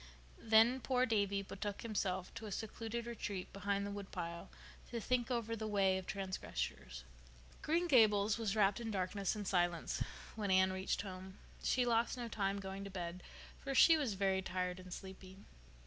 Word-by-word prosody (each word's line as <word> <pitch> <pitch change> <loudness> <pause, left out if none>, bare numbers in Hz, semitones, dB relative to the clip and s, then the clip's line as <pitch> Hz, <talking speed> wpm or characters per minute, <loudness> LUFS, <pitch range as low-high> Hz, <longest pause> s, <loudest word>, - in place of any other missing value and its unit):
Then 225 +3 +5
poor 255 0 +2
Davy 200 -3 +1
betook 200 +1 -5
himself 190 -5 -2
to 225 -1 -7
a - - -6
secluded 225 +2 -4
retreat 205 -5 -5
behind 200 0 -1
the 200 - -4
woodpile 175 -4 -5 0.4
to 235 - -3
think 245 +1 0
over 230 -2 -1
the 220 -1 -4
way 195 -2 +3
of 185 - -10
transgressors. 185 - -4 0.6
Green 340 +3 +1
Gables 215 -6 +5
was 220 -2 0
wrapped 205 0 +3
in 230 -1 -4
darkness 195 0 -1
and 205 -2 -4
silence 175 -2 +1 0.3
when 210 -3 -2
Anne 190 0 +4
reached 190 +1 -1
home. 190 0 -8 0.2
She 250 -1 +2
lost 235 +1 +2
no 240 -1 -3
time 200 -3 -1
going 195 0 -5
to 200 - -6
bed, 180 -1 -5 0.4
for 275 -1 -4
she 330 +5 +8
was 275 -10 0
very 190 -1 +1
tired 180 0 -2
and 185 0 -11
sleepy. 190 0 -9
200 Hz, 170 wpm, -37 LUFS, 190-225 Hz, 0.6 s, she